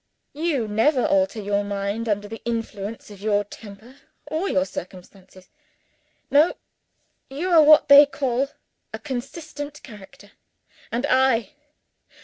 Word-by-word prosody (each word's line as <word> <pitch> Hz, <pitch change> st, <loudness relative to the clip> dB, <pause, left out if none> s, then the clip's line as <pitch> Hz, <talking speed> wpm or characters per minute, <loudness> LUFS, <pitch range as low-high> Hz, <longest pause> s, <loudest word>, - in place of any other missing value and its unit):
You 290 Hz, -6 st, -1 dB
never 240 Hz, +6 st, +2 dB
alter 290 Hz, -6 st, +1 dB
your 205 Hz, 0 st, -1 dB
mind 200 Hz, +3 st, -3 dB
under 205 Hz, 0 st, -1 dB
the 225 Hz, +2 st, -9 dB
influence 225 Hz, -2 st, -5 dB
of 200 Hz, -1 st, -13 dB
your 205 Hz, -1 st, +1 dB
temper 215 Hz, +5 st, -13 dB, 0.3 s
or 325 Hz, +6 st, -2 dB
your 185 Hz, 0 st, +1 dB
circumstances. 185 Hz, 0 st, -11 dB, 0.8 s
No: 295 Hz, +4 st, +4 dB, 0.7 s
you 315 Hz, +7 st, -3 dB
are, 330 Hz, -2 st, +7 dB
what 305 Hz, 0 st, +6 dB
they 285 Hz, 0 st, +9 dB
call, 275 Hz, -1 st, -1 dB, 0.4 s
a -, -, -5 dB
consistent 290 Hz, +2 st, -7 dB
character. 205 Hz, -2 st, -14 dB, 0.6 s
And 240 Hz, +4 st, -1 dB
I? 255 Hz, -6 st, +2 dB
235 Hz, 125 wpm, -23 LUFS, 205-285 Hz, 0.8 s, they